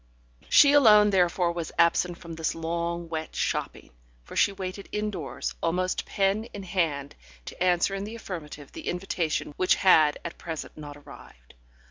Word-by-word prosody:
She 280 - +7
alone 210 -7 +7
therefore 180 -2 +2
was 170 -2 -5
absent 170 +1 +2
from 170 -1 -9
this 160 0 -2
long, 170 +1 -3
wet 160 -1 -5
shopping, - - -3 0.3
for - - -12
she 200 - +4
waited 195 0 -7
indoors, 210 -8 -3
almost 180 +2 -1
pen 200 +3 0
in 205 -4 -9
hand, 160 -7 -1 0.3
to - - -4
answer 180 +1 +2
in 195 0 -3
the 215 +3 -7
affirmative 150 -9 -8
the - - -9
invitation 175 -4 -2
which 185 - +3
had 155 -6 +5
at 170 - -7
present 165 -2 -6
not 145 -1 -9
arrived. - - -15
175 Hz, 155 wpm, -27 LUFS, 160-195 Hz, 0.3 s, She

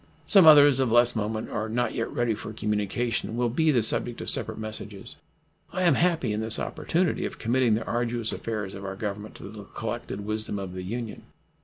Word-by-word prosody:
Some 190 -5 +7
others 145 -3 +8
of 130 -4 +1
less 120 +1 +4
moment 110 0 -3
or 110 0 -3
not 120 +2 -1
yet 115 - -3
ready 120 -2 0
for 110 +1 -7
communication 110 +2 -2
will 120 -1 +1
be 160 +7 +1
the 125 -7 +3
subject 115 +2 +2
of - - -3
separate - - -2
messages. 110 -2 -7 0.6
I 185 +1 -2
am 170 -4 +5
happy 165 -8 +1
in 105 - -2
this 110 0 0
opportunity 175 0 -1
of - - -5
committing 120 -1 +2
the 110 - -3
arduous 120 -1 -1
affairs 105 -4 -4
of 100 0 -8
our 95 0 -5
Government 105 +1 -6
to - - -12
the 105 0 -10
collected 110 -1 -5
wisdom 110 -1 -3
of 95 -2 -6
the 90 - -6
Union. 115 +4 -5
115 Hz, 200 wpm, -26 LUFS, 105-120 Hz, 0.6 s, others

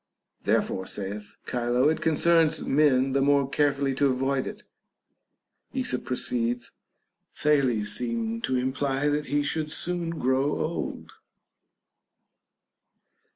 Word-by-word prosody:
Therefore, 95 0 0
saith 100 +1 -6
Chilo, 120 +2 +1
it 160 - +1
concerns 165 0 +3
men 135 -2 +3
the 135 +1 +2
more 140 -1 +3
carefully 140 -1 +1
to 140 +2 +2
avoid 135 +1 0
it. - - -8 1.1
Esop 255 - -1
pro 125 - -1
ceeds, 120 0 -2 0.6
Thales 130 -8 +2
seemed 115 -1 -2
to 130 - -1
imply 135 +2 0
that 150 0 -1
he 145 0 +1
should 155 +1 -1
soon 175 +1 -2
grow 135 -3 +1
old. 165 +2 -4
135 Hz, 110 wpm, -26 LUFS, 125-150 Hz, 1.1 s, concerns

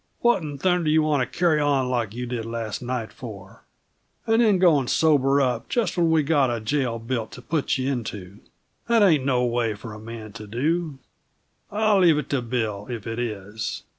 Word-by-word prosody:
What 240 -5 +3
'n 145 -3 -6
thunder 180 +1 +1
you 155 0 +4
want 150 -3 +1
to - - -13
carry 170 -4 +3
on 140 -3 +2
like 120 -4 -2
you 125 +1 -4
did 120 -2 -4
last 115 -1 -4
night, 125 -3 -4
for? 100 -6 -10 0.6
And 225 +1 +3
then 215 -4 +4
go 175 -5 +5
and 130 - -3
sober 140 -3 +3
up 125 -4 0
just 225 -8 0
when 170 -2 +2
we've 160 -2 +3
got 140 -4 +3
a 120 -1 -1
jail 120 +1 -1
built 115 -1 -3
to 125 - -9
put 155 -2 0
you 130 +1 -1
into! 105 -6 -6 0.5
That 230 -2 +4
ain't 160 -9 +4
no 125 -2 +2
way 120 -2 0
for 105 +2 -9
a 105 - -9
man 110 -1 -9
to 105 - -9
do 150 +7 -1 0.7
I'll 210 -1 +2
leave 170 -5 +5
it 150 -2 -4
to 140 -3 +1
Bill 110 -4 -3
if 115 -4 -5
it 115 +1 -4
is! 110 -2 -4
130 Hz, 205 wpm, -24 LUFS, 115-155 Hz, 0.7 s, go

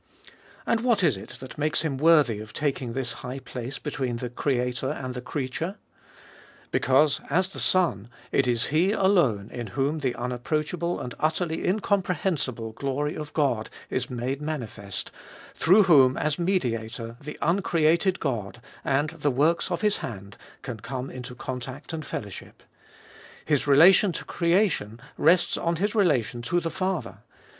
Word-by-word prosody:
And 230 - +2
what 235 -5 +2
is 150 -9 +4
it 95 - -10
that 130 +2 -9
makes 150 -1 +1
Him 150 -4 -1
worthy 150 -7 +4
of 110 0 -9
taking 135 -5 -2
this 130 -1 -2
high 125 +1 -5
place 130 0 -6
between 135 -5 -3
the 120 0 -5
Creator 125 -1 -1
and 130 -3 -4
the 125 - -5
creature? 145 +8 -3 1.0
Because, 135 0 +3
as 185 +2 +2
the - - -7
Son, 140 - +1 0.2
it 135 - +2
is 120 -1 +1
He 180 +6 +3
alone 170 - +2
in 120 -2 -5
whom 145 +4 +1
the 130 -4 -1
unapproachable 155 +8 -2
and 125 - -5
utterly 160 +1 0
incomprehensible 180 - 0
glory 140 +5 -2
of 150 -1 -6
God 130 -8 +1 0.2
is 130 -1 -1
made 125 +3 -3
manifest, 115 -10 -5 0.4
through 190 +6 +5
whom 135 -8 +6
as 150 +1 0
Mediator 115 - -1
the 150 +1 -7
uncreated 170 +1 +2
God, 120 -6 -3 0.2
and 145 +3 +1
the 150 -3 -1
works 150 +8 +2
of 175 - -2
His 210 -1 +2
hand, 100 -3 -7 0.3
can 120 -5 -6
come 130 +4 -5
into 125 0 -8
contact 130 +4 -6
and 160 -1 -4
fellowship. 100 -8 -7 0.8
His 145 -2 +1
relation 175 +7 +7
to - - -6
creation 170 - +1 0.2
rests 175 +2 +3
on 170 0 0
His 205 +5 0
relation 130 - +2
to 145 +9 +1
the 165 -1 -3
Father. 170 - -2
140 Hz, 150 wpm, -26 LUFS, 125-170 Hz, 1.0 s, relation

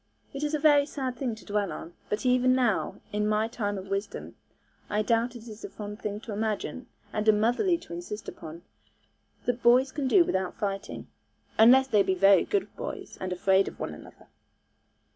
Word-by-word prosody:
It 275 - -5
is 300 +1 0
a - - +1
very 290 -1 +5
sad 265 -4 -4
thing 245 -3 -2
to 220 - -15
dwell 205 -2 -1
on; 170 - -8 0.2
but 210 +5 -2
even 255 0 +4
now, 245 -5 +1 0.2
in 210 0 0
my 215 +1 +1
time 205 -3 -3
of 190 0 -8
wisdom, 200 +1 -4 0.5
I 210 +1 +1
doubt 235 +2 +1
it 235 0 -10
is 215 -1 -10
a - - -5
fond 210 0 -8
thing 205 0 -4
to 225 - -7
imagine, 220 +4 -3 0.3
and 215 0 -2
a - - +9
motherly 245 - +2
to 170 - -11
insist 175 +5 -6
upon, 165 +1 -9 0.8
that 245 0 -1
boys 255 +3 +5
can 275 0 -2
do 355 +6 +6
without 190 - -1
fighting. 195 -1 -4 0.5
Unless 260 +4 +7
they 210 -4 +4
be 190 -1 +1
very 195 0 +5
good 405 -2 -2
boys, - - -7
and 185 -1 -3
afraid 190 +2 +3
of - - -8
one - - -4
another. - - -14
215 Hz, 195 wpm, -28 LUFS, 200-255 Hz, 0.8 s, a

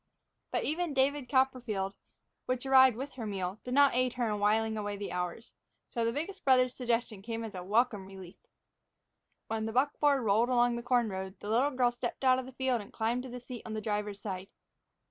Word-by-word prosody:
But - - 0
even 320 -1 -1
"David 270 -1 +1
Copperfield," 245 -8 +1 0.5
which 255 0 -1
arrived 260 -3 +6
with 275 +3 -5
her 235 -4 -6
meal, 190 0 -3
did 250 +1 -3
not 285 -1 +6
aid 250 0 +1
her 245 -2 -1
in 210 - -2
whiling 220 +2 +2
away 205 -1 -3
the 200 - -5
hours. 180 +6 -4 0.4
So 235 - -1
the 230 - +1
biggest 330 +9 -5
brother's 255 -2 +4
suggestion 235 -5 -1
came 230 +2 -4
as 220 -2 -6
a 185 - -5
welcome 210 0 +1
relief. 190 -2 -11 1.1
When 220 0 -2
the 225 - -4
buckboard 280 +1 +2
rolled 220 +3 +3
along 245 -1 +3
the 235 - -3
corn 240 -2 +2
road, 190 0 -6
the 205 - -7
little 250 +6 +3
girl 250 -3 +2
stepped 240 +2 -5
out 255 -1 +5
of 260 - -6
the - - -9
field 260 -3 0
and 200 - -12
climbed 230 +2 -1
to 260 - -8
the 250 +1 -6
seat 245 -1 -8
on 225 - -6
the - - -1
driver's 210 -1 -3
side. 190 -2 -5
235 Hz, 210 wpm, -31 LUFS, 210-255 Hz, 1.1 s, arrived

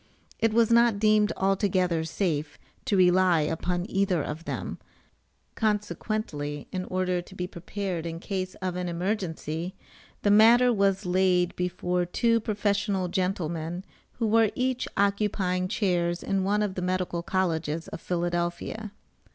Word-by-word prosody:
it 225 -1 +2
was 230 +1 +3
not 235 -2 +5
deemed 215 0 +3
altogether 185 -3 +1
safe 160 -3 -2 0.3
to 215 -7 +1
rely 180 -2 +5
upon 175 +3 -1
either 195 -6 +1
of 155 +3 -6
them, - - -4 0.7
consequently 210 -8 -2
in 185 -1 -3
order 185 -1 -1
to 180 +2 -14
be 180 - -3
prepared 180 -1 -4
in 165 0 -5
case 185 -1 -4
of 185 -1 -1
an 180 -1 -2
emergency, 175 -2 -3 0.5
the 205 - +4
matter 235 +4 +6
was 195 -1 +1
laid 180 -1 +2
before 180 0 -1
two 230 +6 +2
professional 205 -3 0
gentlemen 175 -1 -2 0.3
who 230 - -2
were 220 0 +4
each 255 0 -1
occupying 200 -2 +1
chairs 180 -4 0
in 195 -1 0
one 205 +2 +1
of 205 -2 -2
the 185 - -4
medical 180 -1 -1
colleges 165 -4 -1
of 165 - -7
Philadelphia. 175 +4 -2
185 Hz, 135 wpm, -27 LUFS, 175-205 Hz, 0.7 s, matter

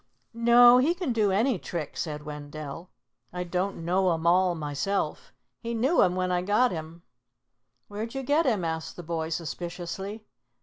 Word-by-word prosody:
"No, 240 +1 +7
he 315 +7 +2
can 350 -9 -2
do 215 -3 +2
any 220 +2 +2
trick," 160 -4 -5
said 150 -2 -4
Wendell. 150 +2 -7 0.4
"I 180 0 -3
don't 180 0 -3
know 185 +1 +2
'em 165 +1 -6
all 180 +1 +4
myself. 155 +6 -3 0.3
He 235 0 -4
knew 265 +9 +3
'em 180 0 +3
when 185 0 -1
I 180 0 +1
got 210 +7 +2
him." 165 0 -7 0.8
"Where'd 220 +4 -6
you 270 - -3
get 290 +3 +2
him?" 210 -8 +1
asked 160 0 -4
the 175 - -8
boy 160 -1 -3
suspiciously. 175 +5 -5
185 Hz, 165 wpm, -27 LUFS, 165-230 Hz, 0.8 s, No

